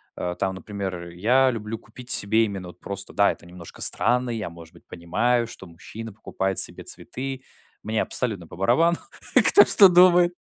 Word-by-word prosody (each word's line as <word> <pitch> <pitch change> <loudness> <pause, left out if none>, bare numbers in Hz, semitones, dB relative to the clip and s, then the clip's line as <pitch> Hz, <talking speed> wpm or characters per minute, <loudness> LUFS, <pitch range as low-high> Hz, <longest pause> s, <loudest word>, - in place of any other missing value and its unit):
а 90 0 -4
там, 95 +1 -3
например, 95 -4 -6
я 125 +9 +2
люблю 110 0 -6
купить 125 +2 -15
себе 110 +3 +3
именно 95 -4 -7
вот 90 - -16
просто, 100 0 -7
да, 100 0 +3
это - - -12
немножко 85 -1 -13
странно. 125 0 +1
Я, 110 -6 -4
может 85 -1 -14
быть, - - -21
понимаю, 115 +8 -1
что 95 -4 -11
мужчина 110 +7 -10
покупает 95 -2 -4
себе - - +1
цветы. 130 0 -5 0.4
Мне 110 0 -1
абсолютно 100 -10 -3
по - - -12
барабану, 135 - +2 0.4
кто 405 - +7
что 195 - +7
думает. 180 0 +5
105 Hz, 170 wpm, -23 LUFS, 95-125 Hz, 0.4 s, кто